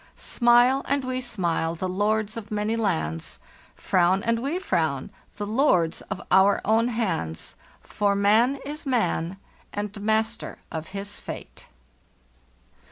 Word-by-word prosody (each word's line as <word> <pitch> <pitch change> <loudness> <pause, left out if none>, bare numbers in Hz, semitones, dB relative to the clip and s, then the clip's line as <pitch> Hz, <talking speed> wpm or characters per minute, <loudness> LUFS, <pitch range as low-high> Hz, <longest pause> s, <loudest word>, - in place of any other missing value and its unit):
"«Smile 240 +2 +4
and 280 -1 0
we 255 0 -2
smile, 170 -8 -1
the 185 +3 -3
lords 210 +3 0
of 220 -2 -7
many 210 +1 -1
lands; 160 - -2 0.4
Frown 185 +2 +2
and 230 0 +1
we 285 +7 -1
frown, 160 - -1 0.3
the 205 - -3
Jords 205 - +2
of - - -3
our 195 +1 +5
own 225 +3 +3
hands; 185 - -2 0.3
For 205 -1 0
man 215 +6 +4
is 295 +1 -6
man 190 -7 0 0.3
and 205 0 -5
master 220 +2 0
of 160 -1 -5
his 200 +1 -5
fate. - - -9
210 Hz, 130 wpm, -25 LUFS, 185-235 Hz, 0.4 s, our